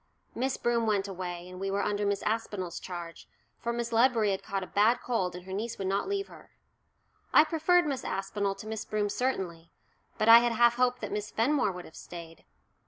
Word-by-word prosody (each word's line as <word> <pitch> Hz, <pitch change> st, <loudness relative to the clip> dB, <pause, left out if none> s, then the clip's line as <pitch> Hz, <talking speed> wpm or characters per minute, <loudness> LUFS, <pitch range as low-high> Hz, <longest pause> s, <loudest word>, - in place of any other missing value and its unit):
Miss 260 Hz, +2 st, -1 dB
Broom 235 Hz, -1 st, +1 dB
went 205 Hz, -2 st, +1 dB
away, 180 Hz, -2 st, -5 dB
and 180 Hz, 0 st, -9 dB
we 195 Hz, 0 st, -2 dB
were 200 Hz, +1 st, 0 dB
under 205 Hz, 0 st, 0 dB
Miss 200 Hz, -1 st, -1 dB
Aspinall's 210 Hz, -5 st, -2 dB
charge, 175 Hz, -2 st, -8 dB, 0.3 s
for 235 Hz, -, -2 dB
Miss 235 Hz, 0 st, -3 dB
Ledbury 230 Hz, -3 st, +3 dB
had 190 Hz, -, -2 dB
caught 195 Hz, -1 st, -3 dB
a -, -, -4 dB
bad 220 Hz, +6 st, +3 dB
cold 190 Hz, -8 st, -1 dB
and 180 Hz, 0 st, -9 dB
her 190 Hz, -, -7 dB
niece 225 Hz, +4 st, -3 dB
would 195 Hz, -, -4 dB
not 195 Hz, -, 0 dB
leave 395 Hz, 0 st, -1 dB
her. -, -, -15 dB, 0.8 s
I -, -, +8 dB
preferred 330 Hz, +2 st, +3 dB
Miss 275 Hz, -3 st, -2 dB
Aspinall 195 Hz, +1 st, -2 dB
to 195 Hz, +2 st, -10 dB
Miss 220 Hz, 0 st, -4 dB
Broom 210 Hz, -1 st, -1 dB
certainly, 190 Hz, -8 st, -2 dB, 0.5 s
but 215 Hz, -, 0 dB
I 230 Hz, +1 st, +11 dB
had 240 Hz, 0 st, +1 dB
half 235 Hz, +1 st, +4 dB
hoped 250 Hz, 0 st, +2 dB
that 210 Hz, -2 st, -4 dB
Miss 210 Hz, +1 st, -3 dB
Fenmore 245 Hz, -1 st, +1 dB
would 180 Hz, -1 st, -8 dB
have 160 Hz, -, -14 dB
stayed. 165 Hz, -2 st, -10 dB
210 Hz, 210 wpm, -29 LUFS, 190-235 Hz, 0.8 s, I